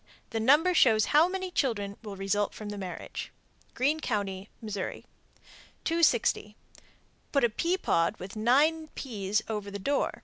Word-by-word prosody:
The 225 - -1
number 295 +10 +5
shows 220 -9 +5
how 310 +3 +7
many 375 0 -4
children 205 - -1
will 210 -3 -7
result 195 +1 -1
from 210 -1 -7
the 205 - -5
marriage. 185 -2 -6 0.4
Greene 290 +5 +1
Co., 215 -8 0
Mo. 195 +1 -7 0.2
260. 230 - -2 0.8
Put 275 - +2
a 240 - +5
pea 340 +11 0
pod 165 - +1
with 190 +3 -8
nine 290 +9 +3
peas 210 -4 -2
over 210 -2 -4
the 200 - -5
door. 280 +8 -1
220 Hz, 145 wpm, -29 LUFS, 200-295 Hz, 0.8 s, how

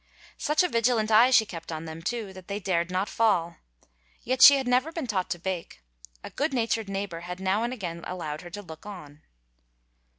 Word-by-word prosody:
Such 305 +3 +2
a - - +2
vigilant 230 -5 +1
eye 230 +4 +7
she 240 -4 +5
kept 170 -4 -8
on 160 0 -5
them, 160 0 -8
too, 215 +1 -4
that 185 -1 -12
they 200 +1 -3
dared 175 -3 0
not 185 +2 -1
fall. 180 -8 +1 0.7
Yet 255 +1 -1
she 280 - +11
had 265 -2 -3
never 255 +5 +2
been 330 -4 -4
taught 190 -6 -2
to 175 - -2
bake; 175 - -5 0.4
a - - -8
good 285 0 -1
natured 225 -3 0
neighbor 195 -3 -4
had 180 +1 -7
now 190 +3 +1
and 240 +1 -1
again 175 -8 -6
allowed 155 -4 -5
her 175 - -10
to 205 +4 -8
look 160 +2 -11
on. 155 -7 -10
195 Hz, 205 wpm, -27 LUFS, 175-230 Hz, 0.7 s, she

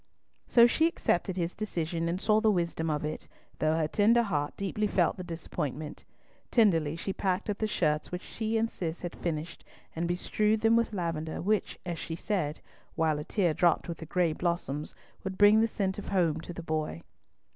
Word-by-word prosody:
So 235 -1 +7
she 315 +7 +4
accepted 190 - 0
his 170 0 -1
decision, 170 -5 -2
and 175 +2 -1
saw 215 +1 +3
the 220 - +4
wisdom 170 -4 0
of 150 0 -1
it, 155 - -5 0.3
though 155 0 +2
her 155 -2 +1
tender 225 +7 +4
heart 150 -9 -2
deeply 205 +2 -1
felt 180 -4 +2
the 185 - -6
disappointment. 155 -3 -5 0.4
Tenderly 165 - +3
she 190 +3 -3
packed 190 +2 -1
up 200 - -5
the 220 - +1
shirts 155 -7 0
which 180 0 -4
she 225 0 -2
and 225 +1 +2
Cis 170 -6 -5
had 175 - -4
finished, 165 -1 -4 0.3
and 170 +1 -1
bestrewed 210 +5 +1
them 225 +1 +5
with 230 -1 +2
lavender, 165 -5 -3
which, 210 +2 0
as 170 -3 -3
she 165 - -4
said, 170 -5 -2 0.3
while 160 -3 +1
a - - -4
tear 175 -1 +1
dropped 175 +2 +2
with 170 - -5
the 160 - -8
gray 170 -1 +1
blossoms, 155 -4 -2 0.3
would 190 -1 -4
bring 210 +1 +7
the 225 - +3
scent 195 -3 -2
of - - -8
home 170 -5 +1
to 170 - -8
the 170 0 -7
boy. 155 - -2
175 Hz, 195 wpm, -29 LUFS, 160-205 Hz, 0.4 s, So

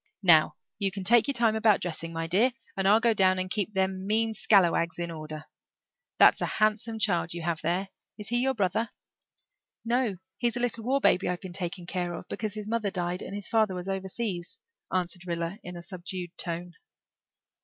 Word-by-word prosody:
Now, 160 -4 +6 0.2
you 195 -2 +1
can 195 0 -5
take 235 +5 +5
your 280 - +1
time 230 -2 +3
about 220 -2 +4
dressing, 165 -1 -4
my 165 0 -3
dear, 210 +10 +3 0.2
and 195 0 +1
I'll 210 +3 +6
go 230 0 +3
down 185 -2 +3
and 185 0 -3
keep 210 -1 -1
them 190 0 0
mean 220 +1 +1
scallawags 175 -6 +3
in 170 -1 -3
order. 155 -1 -7 0.7
That's - - +6
a - - +1
handsome 215 +1 +1
child 175 -6 0
you 170 - -5
have 165 -1 -1
there. 180 +4 -1 0.3
Is 210 0 -7
he 240 +1 +2
your 265 +1 +1
brother?" 215 +3 0 1.0
"No, 235 -4 +1 0.2
he's 240 -1 0
a - - -1
little 240 -2 -1
war 275 +2 +2
baby 185 - +3
I've 180 -1 -2
been 185 -1 -8
taking 175 -1 -4
care 175 -1 -3
of, - - -9
because 215 -2 -4
his 210 -1 -6
mother 220 -2 0
died 180 -1 -3
and 195 - -6
his 205 -1 -5
father 215 -4 +2
was 180 +1 -6
overseas," 190 - -4 0.3
answered 180 0 -2
Rilla 170 +3 -3
in 180 0 -7
a 170 - -8
subdued 180 -1 -6
tone. 175 0 -4
190 Hz, 195 wpm, -28 LUFS, 175-220 Hz, 1.0 s, Now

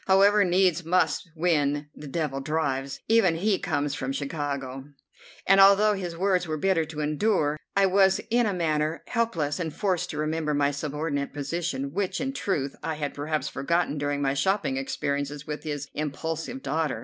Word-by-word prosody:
However, 200 +2 +5
needs 180 -1 +2
must 165 -1 +1
when 145 -3 +1
the 150 - -9
devil 145 -2 -2
drives, 140 -2 -2
even 220 -7 +4
if 165 - -5
he 205 -3 +2
comes 145 0 -1
from 135 -1 -3
Chicago; 140 -2 -4 0.6
and 195 0 +6
although 200 +2 +6
his 180 -4 -4
words 185 -1 +1
were 155 -1 -2
bitter 170 0 +2
to 155 -1 -6
endure, 150 0 +1 0.2
I 200 0 +5
was 190 0 +4
in 240 -1 +3
a - - +1
manner 155 -2 0
helpless 185 -12 -1
and 165 -3 -2
forced 185 +1 -1
to 150 - -5
remember 155 0 -1
my 145 0 +2
subordinate 145 0 -3
position, 140 -2 -3
which, 195 0 -1
in 265 +1 -2
truth, 145 - -2
I 160 -1 -2
had 145 -2 -3
perhaps 150 +1 -2
forgotten 155 +1 0
during 145 0 -1
my 135 0 +1
shopping 190 0 +1
experiences 140 +2 -3
with 150 0 -5
his 145 -2 -4
impulsive 160 - -4
daughter. 155 -3 -1
155 Hz, 175 wpm, -26 LUFS, 145-185 Hz, 0.6 s, and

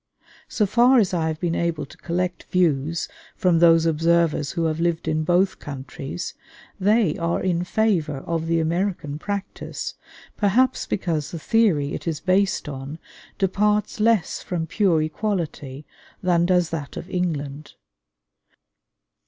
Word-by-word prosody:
So 210 - +1
far 245 +6 +5
as 200 -6 +3
I 165 -2 +1
have 160 -1 -3
been 175 -2 -1
able 170 -2 -1
to - - -15
collect 180 +1 -3
views 165 -3 +1 0.3
from 180 -3 +2
those 165 -1 +6
observers 165 -2 +2
who 170 -3 0
have 160 0 -1
lived 170 -1 0
in 155 0 +1
both 180 +4 +2
countries, 140 +3 -6 0.5
they 205 -4 +2
are 170 0 0
in 175 -2 +1
favor 180 -7 +1
of 165 +3 -3
the 165 0 +2
American 165 -3 -1
practice, 200 +2 -5 0.4
perhaps 240 +6 +2
because 165 -7 -1
the 170 - -6
theory 165 -6 +2
it - - -6
is 160 -3 -1
based 190 -1 +1
on 140 +1 -6 0.4
departs 210 +2 +1
less 220 -4 +2
from 170 -3 -3
pure 165 -2 +2
equality 155 -6 -3 0.4
than 175 -1 +3
does 180 -2 +2
that 145 -4 -5
of - - -6
England. 150 -6 -3
170 Hz, 140 wpm, -23 LUFS, 155-190 Hz, 0.5 s, those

